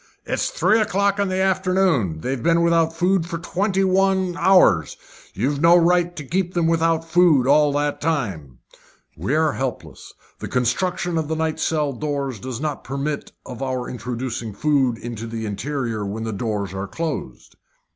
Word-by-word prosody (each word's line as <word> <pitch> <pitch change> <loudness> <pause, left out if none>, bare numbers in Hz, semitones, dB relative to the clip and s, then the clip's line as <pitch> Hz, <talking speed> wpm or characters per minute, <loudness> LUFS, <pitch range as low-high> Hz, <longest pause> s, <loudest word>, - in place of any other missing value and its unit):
"It's - - -1
now - - -16
three 220 - +4
o'clock 200 -1 +1
in 200 - +1
the 185 0 -1
afternoon. 185 - +1
They've 130 +3 -3
been 170 +3 +3
without 165 -1 +3
food 175 +1 +1
for 170 -1 -4
twenty 190 +3 -1
one 190 -1 +2
hours. 170 - +4 0.4
You've 140 +8 -1
no 170 +1 +7
right 175 0 +2
to 150 - -6
keep 180 +4 -2
them 170 -1 +2
without 165 0 +1
food 165 -6 +4
all 145 +2 +4
that 145 0 -1
time." 100 - -2 0.6
"We 95 - -2
are 155 -1 +2
helpless. 130 -2 -5 0.3
The - - -5
construction 175 +7 0
of 155 - -3
the 160 - -2
night 160 0 -2
cells 145 -5 -2
does 125 +1 -6
not 150 -1 -3
permit 140 +2 -4
of 125 0 -8
our 130 -2 -2
introducing 120 -2 -5
food 135 -3 +1
into 115 -1 -6
the 115 -1 -5
interior 115 0 -3
when 105 +3 -4
the 110 -1 -3
doors 100 -3 -3
are 95 +1 -4
closed." 155 - -5
150 Hz, 165 wpm, -22 LUFS, 120-175 Hz, 0.6 s, no